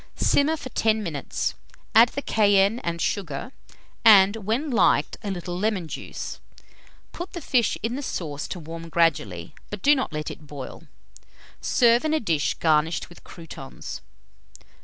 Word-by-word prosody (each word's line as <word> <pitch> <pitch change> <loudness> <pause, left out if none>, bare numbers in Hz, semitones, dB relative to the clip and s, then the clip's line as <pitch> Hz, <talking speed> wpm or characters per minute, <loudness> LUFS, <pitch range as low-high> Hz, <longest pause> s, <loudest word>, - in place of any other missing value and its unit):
Simmer 305 +3 +2
for 260 - -8
10 220 -2 +1
minutes, 155 -7 -3 0.4
add 230 +2 +7
the 280 - -5
cayenne 205 +1 +3
and 170 -4 -3
sugar, 170 - -2 0.5
and, 200 -1 +7
when 225 +8 -2
liked, 230 - +3
a 210 - -4
little 175 -2 -4
lemon 190 -2 -1
juice. - - -6 0.7
Put 350 +2 -7
the 345 - -4
fish 250 -7 +1
in 230 +2 -1
the - - -4
sauce 150 - -4
to 180 - -5
warm 165 +1 -8
gradually, 105 - 0 0.2
but 205 -2 -7
do 290 - +6
not 265 -8 -1
let 150 -1 -4
it 150 - -12
boil. 140 -3 -9 0.7
Serve 235 0 +4
in 310 0 +1
a - - +2
dish 160 - 0
garnished 160 0 +1
with 175 - -16
croûtons. 160 -6 -9
195 Hz, 155 wpm, -25 LUFS, 165-235 Hz, 0.7 s, add